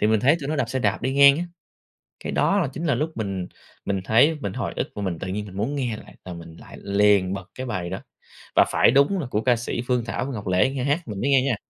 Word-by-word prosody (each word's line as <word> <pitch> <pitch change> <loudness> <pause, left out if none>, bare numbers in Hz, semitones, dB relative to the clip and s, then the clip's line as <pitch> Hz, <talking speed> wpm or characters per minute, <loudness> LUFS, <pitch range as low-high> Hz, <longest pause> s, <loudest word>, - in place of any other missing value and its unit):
Thì 105 - +3
mình 110 -1 +3
thấy 140 +6 +4
tụi 140 - -5
nó 155 - -1
đạp - - 0
xe 130 - -1
đạp 110 -4 0
đi 130 - 0
ngang 140 +1 +7
á, 175 - -2 0.8
cái - - -3
đó 200 - +2
là 165 - 0
chính 160 +5 -4
là 145 -6 +2
lúc 155 +6 -1
mình 100 -4 -3 0.4
mình 100 -1 -1
thấy, 135 +9 +4
mình 100 - -3
hồi - - -3
ức - - -2
và 105 - -4
mình 90 -5 -3
tự 95 - -5
nhiên 105 +2 -3
mình 95 -2 -10
muốn 115 +8 -1
nghe 125 -6 -2
lại, - - -14
là 90 - -6
mình 85 -1 -10
lại - - -12
liền 100 -2 +3
bật 100 +1 -7
cái 130 - -5
bài 90 -7 -3
đó. 95 - -4 0.6
Và - - +7
phải - - +5
đúng 140 +9 +3
là 145 - -4
của 105 - 0
ca 125 -2 +3
sĩ 120 0 -3
Phương 125 -2 +1
Thảo 115 - -3
với 135 - -5
Ngọc 105 -3 -6
Lễ 95 +8 +3
nghe 135 -2 -3
hát 145 +2 -1
mình 100 -2 -5
mới 140 +5 +1
nghe 135 -2 +5
nha. 135 -3 +1
115 Hz, 295 wpm, -24 LUFS, 100-140 Hz, 0.8 s, ngang